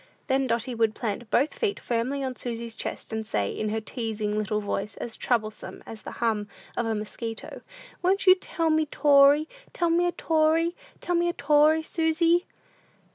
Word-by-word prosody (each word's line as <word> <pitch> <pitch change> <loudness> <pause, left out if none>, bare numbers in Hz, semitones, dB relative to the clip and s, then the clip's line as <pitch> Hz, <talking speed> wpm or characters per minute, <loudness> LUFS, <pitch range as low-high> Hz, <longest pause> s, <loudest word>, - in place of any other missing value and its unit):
Then 265 -1 +1
Dotty 235 +1 -1
would 225 -2 +1
plant 225 0 -4
both 290 - +2
feet 430 -4 -1
firmly 250 +4 -1
on 260 -1 -3
Susy's 235 -2 -5
chest, - - -5
and 220 0 -2
say, 105 - -1
in 215 - -2
her 220 +1 -1
teasing 220 -2 -3
little 215 0 0
voice, 205 0 -3
as 230 - -5
troublesome 215 -3 -2
as 220 -1 -9
the - - -8
hum 220 -3 -1 0.3
of 240 - -1
a 225 - 0
mosquito, 220 +2 -6 0.4
"Won't 390 +2 +2
you 370 - +9
tell 335 -3 -1
me 310 0 +2
'tory 285 +1 +5 0.3
tell 345 -1 +1
me 350 +1 +3
a - - +1
'tory 325 +1 +2 0.3
tell 355 - -1
me 345 0 +2
a - - -1
'tory, 300 +2 +4
Susy." 330 +2 +2
260 Hz, 180 wpm, -26 LUFS, 220-320 Hz, 0.4 s, you